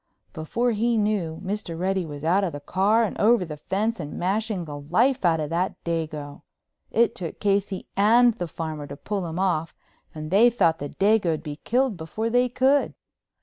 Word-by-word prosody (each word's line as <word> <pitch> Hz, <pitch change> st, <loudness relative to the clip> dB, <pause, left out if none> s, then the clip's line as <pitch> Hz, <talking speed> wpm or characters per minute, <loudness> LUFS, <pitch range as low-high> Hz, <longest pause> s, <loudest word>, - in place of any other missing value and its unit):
Before 235 Hz, +10 st, -1 dB
he 230 Hz, +2 st, +1 dB
knew, 200 Hz, -7 st, -1 dB
Mr. 190 Hz, -4 st, -4 dB
Reddy 185 Hz, 0 st, -1 dB
was 145 Hz, -1 st, -8 dB
out 180 Hz, +5 st, +2 dB
of 175 Hz, -5 st, -2 dB
the 145 Hz, -, -5 dB
car 200 Hz, +9 st, +2 dB
and 220 Hz, -, -2 dB
over 225 Hz, -3 st, +4 dB
the 155 Hz, -2 st, -6 dB
fence 205 Hz, +9 st, -2 dB
and 150 Hz, -3 st, -6 dB
mashing 200 Hz, 0 st, -1 dB
the 145 Hz, -2 st, -7 dB
life 220 Hz, -, +1 dB
out 165 Hz, -2 st, +3 dB
of 155 Hz, 0 st, -3 dB
that 175 Hz, +3 st, 0 dB
dago. 155 Hz, -4 st, -4 dB, 0.5 s
It 235 Hz, +1 st, +2 dB
took 170 Hz, -3 st, -6 dB
Casey 200 Hz, -2 st, 0 dB
and 235 Hz, +4 st, +5 dB
the 180 Hz, -6 st, -4 dB
farmer 155 Hz, -2 st, -5 dB
to 140 Hz, -, -8 dB
pull 195 Hz, +1 st, -3 dB
him 165 Hz, +1 st, -5 dB
off 175 Hz, -4 st, 0 dB, 0.4 s
and 155 Hz, +1 st, -6 dB
they 220 Hz, +5 st, +6 dB
thought 170 Hz, -9 st, +2 dB
the 145 Hz, -, -5 dB
dago'd 195 Hz, -6 st, +1 dB
be 150 Hz, -3 st, -6 dB
killed 245 Hz, +2 st, 0 dB
before 215 Hz, +8 st, -3 dB
they 245 Hz, +1 st, +3 dB
could. 265 Hz, +3 st, +2 dB
190 Hz, 190 wpm, -25 LUFS, 160-220 Hz, 0.5 s, they